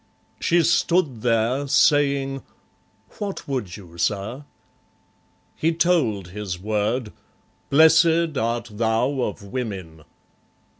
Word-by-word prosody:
She 170 0 +2
stood 165 -7 +1
there, 120 +4 +1
Saying, 140 -2 +2 0.8
"What 200 -2 -5
would 120 -10 -4
you, 85 -4 -14
Sir?" 110 - -2 1.1
He 165 +1 0
told 140 - +1
his 95 -2 -5
word, 105 +3 -2 0.6
"Blessed 160 +1 +4
art 115 -1 -2
thou 115 +5 0
of 105 -3 -3
women!" 95 -8 -6
125 Hz, 95 wpm, -23 LUFS, 105-145 Hz, 1.1 s, Blessed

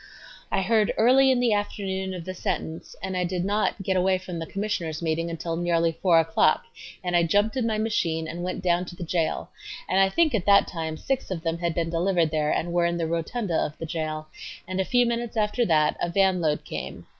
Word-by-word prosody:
I 195 - +1
heard 215 +1 +2
early 260 +4 +5
in 260 -2 +3
the 240 -3 +3
afternoon 190 -2 -2
of 170 -2 -7
the 185 - -4
sentence, 180 -4 -4
and 190 - -3
I 180 - 0
did 180 0 -2
not 205 0 0
get 190 0 0
away 185 +1 +3
from 180 -2 -7
the 165 - -5
Commissioners' 190 -6 -3
meeting 165 +1 -1
until 165 0 -3
nearly 170 -1 +1
4 165 +1 +3
o'clock 165 - +2 0.4
and 180 -1 -1
I 175 - +5
jumped 205 +7 +2
in 250 -3 0
my 220 -1 0
machine 170 -7 0
and 170 +2 -6
went 185 +1 -4
down 175 0 +2
to 175 - -9
the 175 - -6
jail, 165 -1 -1 0.4
and 190 - +2
I 195 0 +5
think 315 +8 +2
at 205 -5 -1
that 200 0 +6
time 160 -2 -4
six 270 +7 -2
of 175 -4 -4
them 165 0 -1
had 170 -2 -1
been 165 -1 -1
delivered 170 -1 +1
there 155 -1 0
and 170 +1 -1
were 175 -1 +3
in 170 0 -1
the 165 - -1
rotunda 170 +5 -2
of 150 -1 -1
the 165 - -5
jail, 155 -1 -3 0.4
and 185 +1 -1
a - - -1
few 245 +3 +3
minutes 235 -1 -2
after 215 +3 +1
that 155 -3 +3
a - - 0
van 190 0 +2
load 150 -2 0
came. - - -6
180 Hz, 230 wpm, -25 LUFS, 165-205 Hz, 0.4 s, that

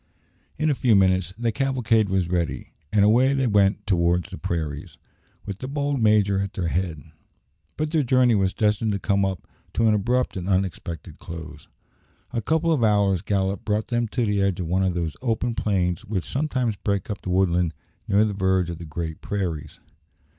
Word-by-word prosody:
In 155 0 +2
a - - +3
few 125 -4 +3
minutes 95 -2 +3
the 115 0 0
cavalcade 115 -5 +1
was 95 -2 +1
ready, 85 -8 -2 0.2
and 105 -1 +4
away 125 +6 +4
they 135 -1 +1
went 100 -3 +2
towards 85 -2 +1
the - - -6
prairies, 75 -4 -4 0.5
with 100 -1 -6
the 130 - -5
bold 140 -1 -1
major 105 -3 +3
at 100 0 -3
their 85 -3 -2
head. 85 -4 -2 0.7
But 155 0 -1
their 160 -2 +3
journey 130 -2 +3
was 95 -3 +1
destined 105 0 +1
to 100 - -2
come 100 0 +1 0.5
to 115 - +3
an 110 - +4
abrupt 120 +5 0
and 90 +1 -4
unexpected 90 -4 -2
close. 80 -3 -9 0.7
A 115 - -1
couple 160 +7 +1
of 135 -7 +1
hours' 100 -4 +3
gallop 95 0 -1
brought 105 0 -1
them 120 -1 0
to 120 +2 -1
the 105 -2 +1
edge 100 -2 +1
of 90 - -2
one 90 +4 0
of 95 -2 +1
those 80 -4 -2
open 120 -1 0
plains 90 -6 0
which 95 -4 -3
sometimes 130 -6 -1
break 100 0 -2
up 105 - -5
the - - -6
woodland 90 -2 +2 0.4
near 105 +2 +4
the 105 - -2
verge 95 -2 +1
of 85 - -7
the 85 - -7
great 80 0 -5
prairies. 90 -7 -4
100 Hz, 190 wpm, -24 LUFS, 90-115 Hz, 0.7 s, and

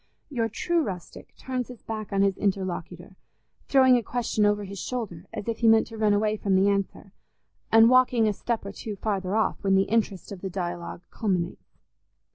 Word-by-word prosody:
Your 230 -4 0
true 340 +9 0
rustic 185 - -7
turns 255 -2 -3
his 250 -2 -12
back 215 -2 -5
on 195 0 +2
his 195 -1 +2
interlocutor, 185 -2 -3 0.5
throwing 260 -2 +5
a - - 0
question 225 -3 0
over 205 0 +1
his 200 0 -7
shoulder 200 -8 -5
as 210 -1 -6
if 230 -1 -2
he 230 - +3
meant 225 0 +6
to 225 - -9
run 215 -1 +3
away 210 +1 +1
from 195 -2 0
the 195 +2 +4
answer, 200 0 -2 0.6
and 225 0 +7
walking 250 -2 +4
a 210 - +1
step 230 +1 -3
or 200 - -5
two 210 +1 -6
farther 195 -1 -2
off 220 - 0
when 195 -1 +3
the 195 - +4
interest 205 -4 -1
of 195 -3 -8
the 190 - -4
dialogue 175 -1 -5
culminates. 180 -5 -3
205 Hz, 195 wpm, -26 LUFS, 190-225 Hz, 0.6 s, and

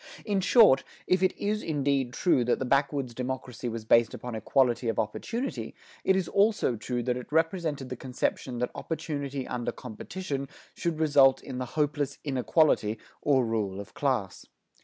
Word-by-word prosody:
In 200 -3 +1
short, 205 - +6 0.2
if 185 0 +2
it 185 0 +2
is 210 +1 -1
indeed 140 -4 0
true 130 -2 +2
that 120 - +2
the 130 - -3
backwoods 140 -1 +1
democracy 125 -1 -4
was 115 -1 -5
based 115 0 +4
upon 125 -1 -7
equality 120 +2 +1
of 115 - -2
opportunity, 230 - -3 0.3
it 190 - +3
is 190 -3 0
also 205 - +2
true 120 +2 -3
that 125 0 0
it 125 - -9
resented 160 -4 0
the 125 - -4
conception 125 0 -3
that 125 +1 -1
opportunity 140 -4 -4
under 120 -1 -3
competition 140 - -5 0.3
should 170 -2 -2
result 140 -4 +5
in 130 -2 -6
the 130 - -2
hopeless 145 -2 0
inequality, 135 -5 +2 0.2
or 135 -4 +3
rule 105 -4 -2
of 100 - -9
class. - - -1
135 Hz, 160 wpm, -28 LUFS, 125-160 Hz, 0.3 s, short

